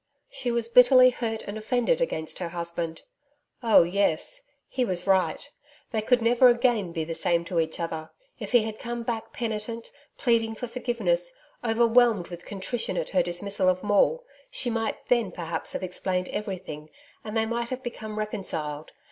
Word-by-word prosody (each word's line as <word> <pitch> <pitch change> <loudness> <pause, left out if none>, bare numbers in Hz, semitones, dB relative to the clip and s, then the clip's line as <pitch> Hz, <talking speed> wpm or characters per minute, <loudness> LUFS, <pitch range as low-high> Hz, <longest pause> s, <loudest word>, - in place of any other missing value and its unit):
She 245 - -3
was 235 -1 0
bitterly 250 +1 +7
hurt 225 -3 -3
and 205 +2 -6
offended 245 - +1
against 160 - -2
her 175 -2 -3
husband. 170 -1 -2 0.6
Oh, 230 -7 +6
yes. 200 - +1 0.2
He 255 - -1
was 180 -6 -1
right. 190 - +1 0.4
They 220 - 0
could 245 +2 +2
never 240 +2 +6
again 240 -6 +2
be 165 -1 -2
the 165 +1 -4
same 170 +1 +1
to 170 0 -1
each 160 -1 -1
other. 160 -2 -4 0.3
If - - -6
he 240 -3 +5
had 220 0 -5
come 235 0 -4
back 230 -1 -4
penitent, 230 0 -4 0.3
pleading 225 -3 +1
for 245 - -5
forgiveness, 250 - 0 0.3
overwhelmed 230 -3 +3
with 175 0 -9
contrition 205 +4 -2
at - - -2
her 185 - +3
dismissal 185 +2 0
of 185 0 0
Maule, 210 - +3 0.3
she - - -1
might 225 -1 -1
then 235 -6 +2
perhaps 165 -2 -4
have - - -3
explained 180 0 -2
everything 185 -7 -5 0.3
and 220 +1 -4
they 220 - +2
might 235 +1 -2
have 260 0 -5
become 220 -3 -6
reconciled. 160 -8 -3
220 Hz, 170 wpm, -26 LUFS, 175-240 Hz, 0.6 s, bitterly